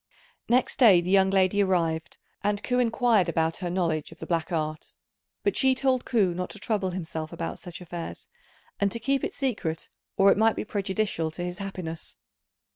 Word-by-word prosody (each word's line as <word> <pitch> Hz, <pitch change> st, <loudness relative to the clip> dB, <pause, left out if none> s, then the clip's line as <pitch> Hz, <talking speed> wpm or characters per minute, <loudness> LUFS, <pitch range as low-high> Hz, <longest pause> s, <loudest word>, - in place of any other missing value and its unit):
Next 255 Hz, +2 st, +2 dB
day 210 Hz, -9 st, +8 dB
the 175 Hz, +2 st, -2 dB
young 190 Hz, -1 st, +5 dB
lady 195 Hz, +1 st, +3 dB
arrived, 165 Hz, -4 st, 0 dB, 0.3 s
and 205 Hz, 0 st, 0 dB
Ku 250 Hz, 0 st, +1 dB
inquired 230 Hz, -5 st, +3 dB
about 165 Hz, 0 st, 0 dB
her 180 Hz, -2 st, -3 dB
knowledge 170 Hz, -4 st, -1 dB
of 165 Hz, -, -13 dB
the -, -, -7 dB
black 170 Hz, +1 st, -1 dB
art; 155 Hz, -2 st, -3 dB, 0.5 s
but 405 Hz, -, +1 dB
she 265 Hz, -1 st, +3 dB
told 260 Hz, -1 st, +1 dB
Ku 200 Hz, -7 st, +2 dB
not 180 Hz, +1 st, -4 dB
to 210 Hz, -, -7 dB
trouble 205 Hz, -2 st, -1 dB
himself 160 Hz, -3 st, -5 dB
about 165 Hz, -, -5 dB
such 175 Hz, -1 st, -9 dB
affairs, 175 Hz, -1 st, -7 dB, 0.5 s
and 200 Hz, -1 st, +2 dB
to 230 Hz, -, -3 dB
keep 275 Hz, +3 st, 0 dB
it -, -, -3 dB
secret 205 Hz, -, -2 dB, 0.3 s
or 195 Hz, 0 st, +6 dB
it -, -, +2 dB
might 220 Hz, 0 st, +4 dB
be -, -, -3 dB
prejudicial 195 Hz, -5 st, -1 dB
to 160 Hz, +3 st, -6 dB
his 180 Hz, 0 st, -5 dB
happiness. 185 Hz, -5 st, -6 dB
190 Hz, 190 wpm, -27 LUFS, 170-220 Hz, 0.5 s, day